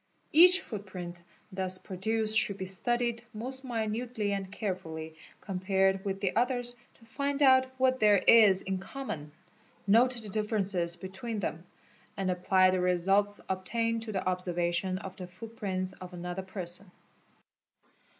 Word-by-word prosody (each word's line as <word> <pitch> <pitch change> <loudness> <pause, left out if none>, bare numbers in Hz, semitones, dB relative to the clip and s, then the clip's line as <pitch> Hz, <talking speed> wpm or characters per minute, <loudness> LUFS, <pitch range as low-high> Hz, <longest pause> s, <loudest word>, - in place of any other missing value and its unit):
Each 360 +4 +7
footprint 185 -5 -7 0.3
thus 185 -1 -1
produced 215 +4 -1
shoul 205 -2 +4
be 190 - -4
studied 235 +5 -1
most 260 +4 -3
minutely 225 -2 -2
and 195 -1 -4
carefully 165 -6 -5 0.3
compared 190 0 0
with 195 -1 -3
the 190 -3 -1
others 245 0 +2 0.2
to 230 - -20
fin 280 +4 -2
out 260 -1 +6
what 260 0 +2
there 210 -1 +5
is 200 -2 +6
in 190 -1 -2
common, 185 - -6 0.5
note 235 +5 +5
the 220 -3 -5
differences 195 -5 +1
between 190 +5 -6
them, 175 -3 -4 0.5
at 190 -1 0
apply 185 +1 +3
the 185 - 0
results 195 +3 +1
obtained 230 +5 -1
to 225 -1 -2
the 190 -2 -3
observation 180 0 -1
of 190 -1 -8
the 180 -2 -7
footprints 190 -1 -5
of 185 -1 -11
anoth 180 +2 -5
person. 185 0 -4
195 Hz, 140 wpm, -30 LUFS, 185-230 Hz, 0.5 s, Each